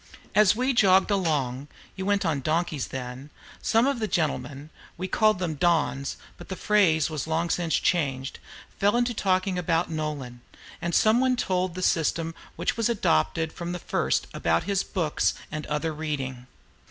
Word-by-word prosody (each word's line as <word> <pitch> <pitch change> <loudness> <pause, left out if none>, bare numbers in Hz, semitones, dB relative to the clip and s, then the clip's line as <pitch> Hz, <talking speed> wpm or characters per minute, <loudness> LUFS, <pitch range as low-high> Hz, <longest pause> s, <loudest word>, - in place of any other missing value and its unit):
As 210 -1 +5
we 255 +3 +1
jogged 195 -3 +4
along 145 -8 0 0.3
(you 190 0 -4
went 205 -1 +2
on 150 -4 0
donkeys 155 -1 -1
then), 130 +2 -7 0.3
some 225 +2 +3
of 275 -3 0
the 215 - -1
gentlemen 155 -4 -2 0.3
(we 185 - -3
boys - - -20
called 215 -2 +4
them 180 -3 -2
"Dons," 155 -4 0 0.2
but - - -12
the 190 - -3
phrase 170 -7 +3
was 155 0 -3
long 165 +1 0
since 170 -2 0
changed) 135 -5 0 0.4
fell 205 +5 +3
to 240 0 -2
talking 185 -2 0
about 165 -1 0
Nolan, 145 -6 -4 0.4
and 175 -1 -1
some 220 +2 +4
one 260 0 +3
told 185 -6 -1
the 185 - -4
system 165 0 +1 0.2
which - - -1
was 230 0 +1
adopted 160 - +1
from 175 0 -5
the - - -3
first - - 0
about - - +1
his 200 -1 0
books 165 -6 0 0.2
and 155 0 -5
other 150 +2 -1
reading. 135 -5 -4
170 Hz, 170 wpm, -26 LUFS, 150-195 Hz, 0.4 s, As